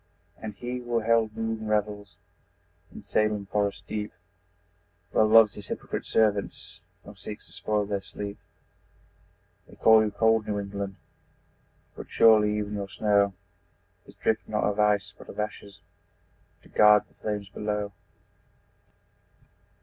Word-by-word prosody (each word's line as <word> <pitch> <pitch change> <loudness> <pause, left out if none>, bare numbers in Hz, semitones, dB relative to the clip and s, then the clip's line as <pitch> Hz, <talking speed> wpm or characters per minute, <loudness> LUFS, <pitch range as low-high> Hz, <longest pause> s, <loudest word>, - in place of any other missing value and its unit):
And 105 -2 -6
he 125 +2 -5
who 120 -1 -1
held 110 -1 +1
moon 110 -1 -3
revels 105 -1 -2 0.8
In - - -11
Salem 105 -1 0
forest 100 -1 -1
deep, 105 0 -4 1.0
Well 110 - +4
loves 110 -1 +7
his 100 - -10
hypocrite - - -5
servants 105 -2 0 0.3
Nor 100 0 -12
seeks 105 +1 -9
to - - -18
spoil 105 +1 -1
their 100 -1 -2
sleep. 100 +1 -7 1.3
They - - -16
call 110 -1 +6
you 110 - 0
cold 110 0 +2
New 105 - -1
England 100 -1 -5 1.0
But - - -9
surely 105 -2 +5
even 105 0 -3
your 100 -1 -4
snow 100 -2 +2 0.7
Is - - -15
drift 110 0 -1
not 105 0 0
of 105 0 0
ice 105 -1 +2
but - - -14
of - - -9
ashes, 100 -1 -5 0.8
To - - -19
guard 105 -1 +6
the - - -29
flames 105 -2 -4
below! 105 0 -3
105 Hz, 135 wpm, -27 LUFS, 100-110 Hz, 1.3 s, loves